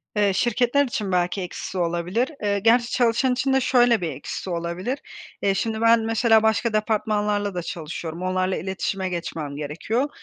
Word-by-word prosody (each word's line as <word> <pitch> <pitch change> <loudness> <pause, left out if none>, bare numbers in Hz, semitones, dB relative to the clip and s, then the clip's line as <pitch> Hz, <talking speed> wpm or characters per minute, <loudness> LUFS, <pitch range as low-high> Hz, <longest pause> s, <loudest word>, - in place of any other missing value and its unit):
Eee, 205 -2 +3
şirketler 245 +5 +2
için 210 -6 -3
belki 180 +2 0
eksisi 185 +1 -6
olabilir. 175 +8 0
Eee, 200 -1 +1
gerçi 235 +3 +3
çalışan 245 +1 +2
için 265 +2 0
de 265 - +3
şöyle 240 -4 +4
bir 165 - -1
eksisi - - -6
olabilir; 175 +9 -3 0.4
eee 195 - +2
şimdi 220 +2 -2
ben, 230 0 +6
mesela 225 0 +3
başka 220 +1 +1
departmanlarla 210 -2 0
da 175 - -1
çalışıyorum, 165 +1 -6
onlarla 185 0 0
iletişime 190 0 -3
geçmem 160 -4 -4
gerekiyor. 170 - -2
205 Hz, 160 wpm, -23 LUFS, 180-235 Hz, 0.4 s, ben